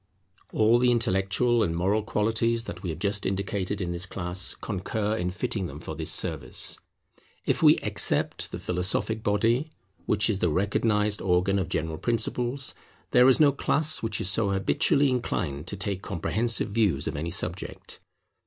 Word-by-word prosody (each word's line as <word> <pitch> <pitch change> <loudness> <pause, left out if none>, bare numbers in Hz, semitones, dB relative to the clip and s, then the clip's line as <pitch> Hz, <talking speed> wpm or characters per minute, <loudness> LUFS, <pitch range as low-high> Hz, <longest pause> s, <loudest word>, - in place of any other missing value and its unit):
All 110 +2 +4
the 125 0 +3
intellectual 115 +1 +2
and 85 -6 0
moral 100 +5 +1
qualities 115 +2 0
that 90 -6 -8
we 95 - -4
have 80 - -4
just 100 +2 -1
indicated 100 0 -2
in 90 -3 -2
this 85 +2 -3
class 90 0 -1
concur 105 +1 -2
in 90 -3 -1
fitting 100 0 -3
them - - -9
for - - -7
this - - -2
service. - - 0 0.7
If - - 0
we - - +7
except - - 0
the - - -4
philosophic 95 +5 -1
body, 115 +8 +1 0.4
which 105 -1 +3
is 100 -4 0
the 90 - +2
recognized 105 +4 +1
organ 95 +2 +2
of 95 - -3
general 80 0 -2
principles, 120 +5 -1 0.4
there 125 +1 +6
is 130 - +4
no 150 -2 +6
class 155 +3 +1
which 115 -2 -2
is - - 0
so 100 +1 +2
habitually 140 - +2
inclined 90 - -2
to - - -4
take 95 0 -3
comprehensive 105 +5 0
views 100 -10 +1
of - - -3
any 80 +4 -3
subject. 90 +1 -4
105 Hz, 165 wpm, -26 LUFS, 90-115 Hz, 0.7 s, we